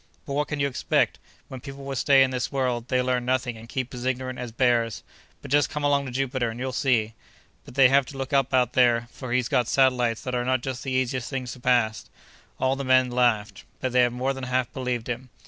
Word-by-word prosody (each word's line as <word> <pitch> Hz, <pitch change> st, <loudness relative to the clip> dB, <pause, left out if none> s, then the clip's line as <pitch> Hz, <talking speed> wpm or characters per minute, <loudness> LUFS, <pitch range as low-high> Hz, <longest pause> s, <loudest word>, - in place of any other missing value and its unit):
"But 140 Hz, -, -5 dB
what 150 Hz, +1 st, 0 dB
can 150 Hz, -, -4 dB
you 140 Hz, -, +2 dB
expect? 135 Hz, -, 0 dB, 0.3 s
When 130 Hz, -, -8 dB
people 140 Hz, 0 st, -9 dB
will 135 Hz, 0 st, -4 dB
stay 135 Hz, +1 st, +5 dB
in 130 Hz, -, 0 dB
this 125 Hz, -1 st, -2 dB
world, 125 Hz, -3 st, -1 dB
they 125 Hz, 0 st, +1 dB
learn 125 Hz, -1 st, 0 dB
nothing 125 Hz, -1 st, -1 dB
and 115 Hz, +1 st, -12 dB
keep 130 Hz, -1 st, -4 dB
as 125 Hz, -1 st, -6 dB
ignorant 130 Hz, 0 st, -2 dB
as 125 Hz, -2 st, -5 dB
bears. 115 Hz, -3 st, +1 dB, 0.4 s
But -, -, -9 dB
just 145 Hz, 0 st, +3 dB
come 150 Hz, -1 st, -4 dB
along 140 Hz, -1 st, +2 dB
to -, -, -6 dB
Jupiter 130 Hz, -2 st, -1 dB
and 115 Hz, +2 st, -7 dB
you'll 130 Hz, +1 st, -2 dB
see. 120 Hz, -4 st, +1 dB, 0.5 s
But -, -, -13 dB
they 135 Hz, -2 st, +7 dB
have 135 Hz, 0 st, +3 dB
to 140 Hz, -, -9 dB
look 135 Hz, +1 st, -5 dB
out 135 Hz, -2 st, +2 dB
up 125 Hz, -2 st, +2 dB
there, 120 Hz, -2 st, +3 dB
for 130 Hz, -2 st, -8 dB
he's 125 Hz, -1 st, +1 dB
got 125 Hz, -3 st, +1 dB
satellites 125 Hz, -4 st, +2 dB
that 125 Hz, -, -4 dB
are 120 Hz, 0 st, 0 dB
not 130 Hz, 0 st, +1 dB
just 130 Hz, -2 st, -4 dB
the 135 Hz, -, -4 dB
easiest 130 Hz, -1 st, -1 dB
things 130 Hz, -3 st, -4 dB
to 130 Hz, -, -12 dB
pass." 120 Hz, -3 st, +1 dB, 0.5 s
All 130 Hz, 0 st, +1 dB
the 140 Hz, -, -4 dB
men 130 Hz, -1 st, +3 dB
laughed, 120 Hz, -4 st, +1 dB, 0.2 s
but 130 Hz, -, -2 dB
they 125 Hz, 0 st, +4 dB
more 125 Hz, +3 st, -2 dB
than 135 Hz, -1 st, -6 dB
half 125 Hz, -1 st, -1 dB
believed 125 Hz, -3 st, -3 dB
him. 125 Hz, +1 st, -5 dB
130 Hz, 240 wpm, -25 LUFS, 120-135 Hz, 0.5 s, they